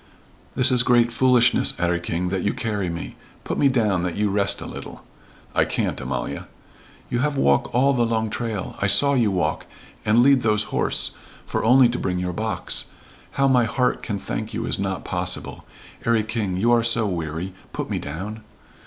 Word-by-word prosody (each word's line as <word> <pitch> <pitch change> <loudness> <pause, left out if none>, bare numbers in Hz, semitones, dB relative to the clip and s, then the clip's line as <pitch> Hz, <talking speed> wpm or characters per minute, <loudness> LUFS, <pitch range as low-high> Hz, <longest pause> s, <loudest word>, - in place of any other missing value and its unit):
"This 130 +1 +4
is 125 -2 +5
great 120 -1 +3
foolishness, 120 0 +3
'Arry 85 0 0
King, 85 +1 -2
that 95 0 -1
you 100 - -1
carry 105 -5 -2
me. 85 0 -6 0.3
Put - - -3
me 140 - +5
down 110 -9 +1
that 90 -1 -2
you 105 -1 +1
rest 100 0 +1
a - - -7
little." - - -9 0.5
"I - - +3
can't, - - -2
Amalia." - - -4 0.6
"You 120 - 0
have 145 +2 0
walk 70 - +2
all 135 +3 +3
the 120 -3 +2
long 110 -1 -1
trail 110 -5 -4
I 100 - +2
saw 140 +8 +5
you 120 -6 +3
walk 85 -5 -1 0.4
and 110 +3 +4
lead 135 -1 +5
those 105 -2 +2
horse, - - 0 0.3
for - - -2
only 125 +2 +6
to 120 +1 -3
bring 90 -1 -2
our 90 - -3
box. 110 +3 -3 0.5
How 140 0 +2
my 125 -3 +4
heart 125 +3 0
can 105 - -3
thank - - -5
you - - -2
is - - -1
not 95 -1 -3
possible. 90 -1 -4 0.4
'Arry 115 -2 +2
King, 105 -4 -2
you 115 +5 +2
are 120 -1 +5
so 115 -1 +2
weary 85 -1 -3 0.2
put - - -4
me - - -1
down." 100 +10 -6
110 Hz, 190 wpm, -23 LUFS, 95-120 Hz, 0.6 s, only